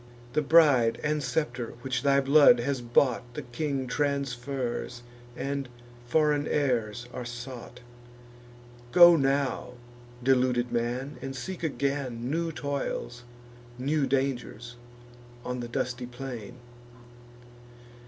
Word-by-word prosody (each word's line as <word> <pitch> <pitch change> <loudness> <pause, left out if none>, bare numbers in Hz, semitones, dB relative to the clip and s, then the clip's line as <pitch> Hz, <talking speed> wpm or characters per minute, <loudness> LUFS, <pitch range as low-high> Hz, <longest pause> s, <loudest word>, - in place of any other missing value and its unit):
The 150 - +2
bride 145 -6 +5
and 150 0 0
scepter 125 -6 -2
which 130 -1 -1
thy 140 -1 +3
blood 140 -3 +6
has 135 0 -1
bought, 120 +1 +2
The 150 - -4
king 135 +2 -3
transfers; 130 -3 -2 0.3
and 140 -2 -3 0.4
foreign 150 +2 +2
heirs 120 -5 0
are 125 - -5
sought. 120 0 -8 1.1
Go 175 0 +9
now, 140 -3 0 0.5
deluded 125 -2 +2
man, 120 +4 -2
and 135 0 -5
seek 175 +8 -6
again 135 -5 -2
New 165 +1 -1
toils, 140 -4 -4 0.5
new 140 +2 0
dangers, 125 -3 -2 0.7
on 125 0 -3
the 120 - -4
dusty 125 0 -3
plain. 125 -3 -7
130 Hz, 105 wpm, -28 LUFS, 120-140 Hz, 1.1 s, Go